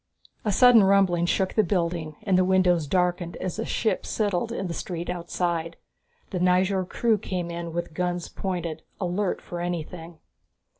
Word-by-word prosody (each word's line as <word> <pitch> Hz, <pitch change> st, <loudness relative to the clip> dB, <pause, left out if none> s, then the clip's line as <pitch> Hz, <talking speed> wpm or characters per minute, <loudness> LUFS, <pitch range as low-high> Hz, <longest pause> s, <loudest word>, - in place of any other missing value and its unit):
A 210 Hz, -, +1 dB
sudden 240 Hz, +1 st, +7 dB
rumbling 190 Hz, -3 st, +3 dB
shook 190 Hz, +1 st, +1 dB
the 215 Hz, -, +4 dB
building 170 Hz, -4 st, -1 dB
and 195 Hz, -3 st, +2 dB
the 185 Hz, -, +5 dB
windows 180 Hz, -4 st, +3 dB
darkened 175 Hz, +1 st, 0 dB
as 185 Hz, -, -4 dB
a -, -, -1 dB
ship 220 Hz, -, 0 dB
settled 205 Hz, 0 st, -1 dB
in 195 Hz, -4 st, -3 dB
the 175 Hz, -, -3 dB
street 175 Hz, 0 st, -4 dB
outside. 170 Hz, -1 st, -2 dB, 0.5 s
The 185 Hz, -, -2 dB
Nyjord 185 Hz, +1 st, +2 dB
crew 225 Hz, -3 st, +1 dB
came 180 Hz, -3 st, -3 dB
in 170 Hz, 0 st, -5 dB
with 170 Hz, -1 st, -4 dB
guns 175 Hz, 0 st, -2 dB
pointed, 175 Hz, -4 st, -4 dB, 0.2 s
alert 185 Hz, +1 st, -1 dB
for 175 Hz, -, -6 dB
anything. 170 Hz, -1 st, -5 dB
180 Hz, 160 wpm, -26 LUFS, 170-190 Hz, 0.5 s, sudden